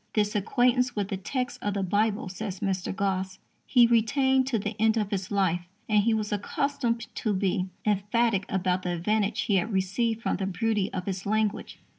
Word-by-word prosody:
"This 210 -1 +1
acquaintance 245 +4 +2
with 205 -2 -1
the - - -1
text 250 +6 -3
of 205 -1 -2
the 195 - 0
Bible," 205 +2 +1
says 195 +1 -5
Mr. 195 -3 -1
Gosse, 190 -1 -2 0.3
"he 245 -2 +6
retained 260 +3 +3
to 255 -4 +1
the 210 +1 -3
end 220 0 +4
of 210 -2 -1
his 195 -2 -2
life, 180 -4 0 0.2
and 210 -1 +4
he 230 +3 +2
was 215 -1 -2
accustomed 235 +3 -1
to 215 - -1
be 185 -1 0 0.2
emphatic 205 0 +1
about 185 -1 0
the 180 -1 -2
advantage 210 +4 0
he 200 - +2
had 215 +5 -1
received 220 +4 0
from - - 0
the 190 0 -2
beauty 205 +1 0
of 180 0 -5
its 190 0 -3
language." 215 0 -1
205 Hz, 190 wpm, -27 LUFS, 190-225 Hz, 0.3 s, he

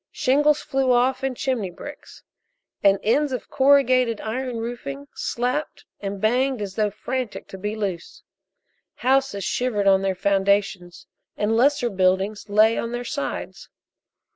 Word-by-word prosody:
Shingles 295 +1 +2
flew 270 -1 +1
off 250 +2 +2
and 265 -2 -2
chimney 255 -9 -1
bricks, 175 - -11 0.6
and 200 -1 +5
ends 285 +7 +2
of 255 - -5
corrugated 255 -4 +4
iron 245 +2 -3
roofing 185 - -6
slapped 250 +5 -3
and 200 -1 -5
banged 250 +4 +1
as 200 -2 -5
though 210 +1 +1
frantic 250 +3 -5
to 190 - -8
be 210 +2 -3
loose. 195 -6 -5 0.7
Houses 265 -5 +1
shivered 220 -1 -1
on 195 -1 +5
their 195 -1 0
foundations, 195 -2 0 0.3
and 210 +2 +1
lesser 250 0 +2
buildings 190 +2 0
lay 215 +2 +4
on 230 +1 -4
their 245 0 -4
sides. 280 +3 -5
225 Hz, 140 wpm, -23 LUFS, 200-255 Hz, 0.7 s, and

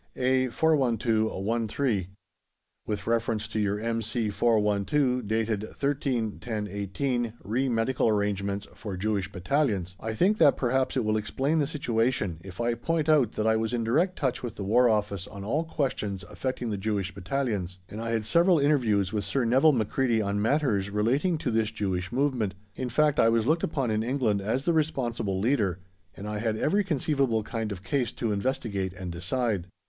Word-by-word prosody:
A/412/1/3. 120 - +1 0.8
With 105 -1 -3
reference 115 -2 0
to 110 - -2
your 105 0 0
M.C.412 115 +2 +1
dated 110 0 0 0.2
13/10/18 115 -3 -2
re 125 +7 0
medical 115 +2 +1
arrangements 100 -1 -1
for 100 -4 -6
Jewish 100 -1 -1
Battalions, 100 - 0
I 110 0 -4
think 200 - +2
that 145 -4 +6
perhaps 130 +1 +1
it 125 - +1
will 110 0 +2
explain 135 +9 0
the 145 - +1
situation 115 - 0
if 95 -2 -11
I 120 0 +1
point 160 +4 -1
out 145 -8 +4
that 110 - -2
I 110 0 +4
was 110 +2 0
in 115 - -1
direct 165 +11 +2
touch 130 -5 -1
with 120 -4 -5
the 100 - -5
War 120 +5 +4
Office 105 -4 0
on 100 -1 -8
all 150 +11 0
questions 105 -11 -2
affecting 125 -3 -3
the 105 - -2
Jewish 100 -1 -2
Battalions, 100 -4 -2
and 105 +4 -7
I 115 - -3
had 115 -2 -1
several 170 - +4
interviews 115 -10 +2
with 105 -2 0
Sir 130 +2 0
Nevil 130 +7 +5
Macready 120 -1 +1
on 100 -1 0
matters 110 -6 +1
relating 125 - +1
to 135 -5 -2
this 110 -1 +1
Jewish 95 -4 -2
movement; 125 -7 0 0.2
in 130 -1 -3
fact, 150 +4 +2
I 115 - +6
was 115 -1 +2
looked 160 +5 +2
upon 135 -7 -1
in 110 0 +1
England 115 -4 0
as 115 +7 -1
the 170 - +3
responsible 120 -11 -1
leader, 105 - +1 0.4
and 100 - -6
I 105 0 -3
had 110 -1 -1
every 200 - +2
conceivable 140 - 0
kind 110 0 -3
of 95 -2 -6
case 125 +4 0
to 115 -3 -2
investigate 100 -4 -2
and 90 -1 -6
decide. 100 +1 -1
115 Hz, 170 wpm, -27 LUFS, 105-130 Hz, 0.8 s, that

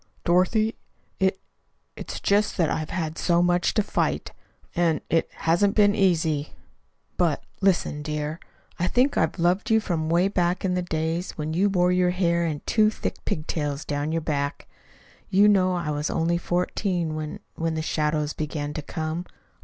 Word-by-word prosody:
"Dorothy, 185 +6 +2 0.4
it 190 0 +2 0.6
it's - - -6
just 205 +1 +1
that 165 -5 +2
I've 155 -1 -2
had 165 -2 -3
so 170 -1 +3
much 175 0 +2
to 215 - +3
fight. - - -1 0.4
And 165 -3 +2
it 165 +1 +2
hasn't 185 +5 +1
been 205 -1 +5
easy. 165 -7 +1 0.6
But, 170 -5 +1 0.2
listen, 180 -6 +1
dear. 150 +1 -3 0.4
I 175 - +1
think 260 +7 +2
I've - - +1
loved 175 +3 +1
you 220 0 +5
from 170 -7 -2
away 175 +3 +3
back 180 -1 0
in 185 - +1
the 180 - 0
days 165 +1 -2
when 155 0 -3
you 195 +5 +3
wore 180 -2 +2
your 180 0 +3
hair 170 -2 +1
in 150 -2 -3
two 215 -1 +4
thick 215 - -5
pigtails 150 -2 -2
down 145 +1 -2
your 165 0 0
back. 145 -2 -2 0.6
You 200 +2 +5
know 185 -3 +4
I 170 -4 -2
was 150 +1 -2
only 170 +1 +1
fourteen 175 -1 -1
when 155 -1 -5
when 165 0 -2
the 160 - -2
shadows 150 -1 0
began 150 -1 -4
to 155 - -4
come. 160 +3 -4
170 Hz, 170 wpm, -25 LUFS, 155-185 Hz, 0.6 s, been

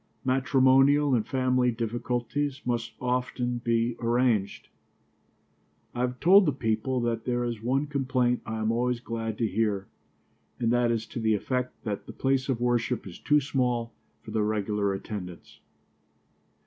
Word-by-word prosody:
Matrimonial 135 +2 +4
and 115 -4 +1
family 130 -1 +2
difficulties 120 +4 -2
must 120 -2 -2
often 125 -1 -1
be 115 0 0
arranged. 115 -3 +1 1.3
I 120 - -6
have 125 0 -1
told 190 +2 +6
the - - +4
people 125 0 -1
that 115 -1 -2
there 120 -1 0
is 120 -3 -3
one 130 +5 0
complaint 130 -4 0
I 110 - -4
am 110 +1 +1
always 120 +1 0
glad 115 -2 -4
to 115 - +1
hear, 105 -2 0 0.7
and 115 -1 +1
that 120 0 +3
is 115 -1 -1
to 120 - -7
the 110 -1 +2
effect 125 +4 -3
that 105 -3 -4
the - - -8
place 135 0 0
of 125 -3 0
worship 120 -1 0
is 90 -3 -9
too 150 0 +3
small 125 -4 -1 0.3
for - - -9
the 110 - 0
regular 105 -1 0
attendants. 95 -3 -7
120 Hz, 150 wpm, -27 LUFS, 115-130 Hz, 1.3 s, told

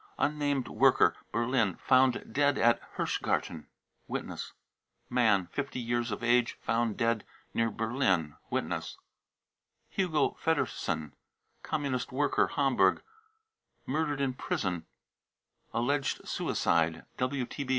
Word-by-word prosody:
unnamed 145 -3 0
worker, - - +4 0.2
Berlin, 115 -4 +1
found 130 -1 +2
dead 145 0 +3
at 120 0 +4 0.2
Hirschgarten. 80 -2 -1 0.4
(Witness.) - - -5 0.6
man, 110 -7 +3
50 140 -2 -3
years 120 0 -1
of 105 +3 -4
age, 120 0 +3
found 115 -2 0
dead 115 -1 +1 0.3
near 115 0 +2
Berlin.'/ 105 - 0
(Witness.) - - -2 0.9
hugo 165 -7 +1
feddersen, 110 - 0 0.5
Communist 140 -5 -2
worker, 145 +2 +2
Hamburg, 130 -9 +2 0.8
murdered 145 0 -1
in 135 -2 +1
prison, 90 -8 -2 0.8
alleged 135 +3 0
suicide. 80 -1 +1
120 Hz, 95 wpm, -30 LUFS, 110-140 Hz, 0.9 s, worker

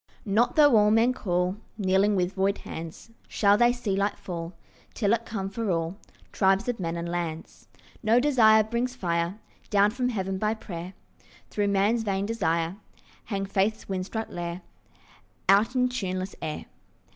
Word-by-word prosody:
Not 225 - +2
though 290 -5 +6
all 210 0 +5
men 225 +3 +4
call, 180 -3 -1 0.2
Kneeling 200 +1 +2
with 180 0 0
void 195 +1 +1
hands, 165 +7 -8 0.2
Shall 200 -1 +3
they 240 +3 +4
see 245 -5 -2
light 200 +1 0
fall 170 -1 -6 0.4
Till 205 -2 +2
it 230 0 -1
come 195 -3 -3
for 215 +2 -3
all 165 0 -1 0.4
Tribes 195 +1 +2
of 245 -3 -2
men 165 -2 -2
and 170 0 -4
lands. 170 -2 -5 0.3
No 230 +2 +4
desire 225 -6 +5
brings 235 +3 -2
fire 170 -2 -1 0.3
Down 205 0 +4
from 250 +2 -1
heaven 190 -4 -2
by 215 +2 0
prayer, 180 -3 -8 0.6
Though 205 -1 0
man's 200 +4 +2
vain 200 -2 -1
desire 170 -5 -1 0.5
Hang 195 -2 -2
faith's 200 +3 0
wind 185 -1 -3
struck 220 +1 -4
lyre 175 +1 -5 0.8
Out 210 +6 +4
in 250 0 +3
tuneless 190 -6 -3
air. 155 - -4
200 Hz, 160 wpm, -27 LUFS, 185-225 Hz, 0.8 s, though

